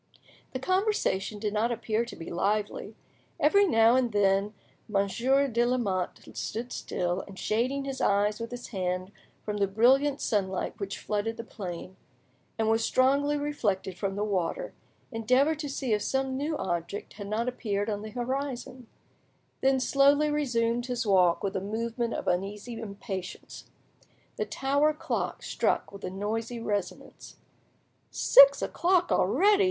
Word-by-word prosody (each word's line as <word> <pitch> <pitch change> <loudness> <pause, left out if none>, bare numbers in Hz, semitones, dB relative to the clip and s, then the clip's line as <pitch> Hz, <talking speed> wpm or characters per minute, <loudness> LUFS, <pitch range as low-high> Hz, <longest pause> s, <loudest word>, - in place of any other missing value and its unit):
The - - -3
conversation 370 - 0
did 210 0 -2
not 220 +3 +1
appear 225 0 -1
to 235 - -9
be 165 - -8
lively. 205 +4 -1 0.4
Every 400 +7 +5
now 225 -5 +5
and 255 -2 +2
then 200 0 +2 0.3
Monsieur 235 +8 +2
de 235 -2 +1
Lamotte 225 -7 -1
stood 235 +3 -4
still, 175 +1 -2
and, 195 -1 -11
shading 255 +8 0
his 270 -1 -4
eyes 205 +2 +2
with 230 0 -5
his 245 0 -8
hand 185 -1 -2 0.3
from 210 -1 -2
the 200 -1 +2
brilliant 265 +8 +3
sunlight 190 -3 -1
which 200 -1 -4
flooded 215 +2 -2
the 230 - -5
plain, 185 -4 -7 0.6
and 220 -1 +1
was 225 +1 +2
strongly 280 +3 +2
reflected 210 -11 -1
from 195 +2 -3
the 205 - -1
water, 205 - -2 0.4
endeavoured 255 +7 +2
to 295 -2 -4
see 265 -4 -1
if 210 - +1
some 265 +2 -1
new 295 +3 -2
object 175 +2 -4
had 205 -1 -8
not 220 +4 -1
appeared 205 -5 -2
on 205 -2 -2
the 215 - -7
horizon, 255 0 -4 0.7
then 265 0 +3
slowly 280 +3 +4
resumed 240 -4 0
his 245 -1 -2
walk 180 -4 +3
with 195 0 -2
a 190 - -1
movement 230 +3 -2
of - - -5
uneasy 200 +6 -2
impatience. 200 -3 -7 0.7
The - - -1
tower 285 +3 +1
clock - - -3
struck - - 0
with 200 0 -11
a 185 - -3
noisy 220 +5 -3
resonance. 205 -5 -4 0.7
"Six - - +7
o'clock 355 0 +1
already!" 370 - +4
225 Hz, 150 wpm, -28 LUFS, 200-265 Hz, 0.7 s, Six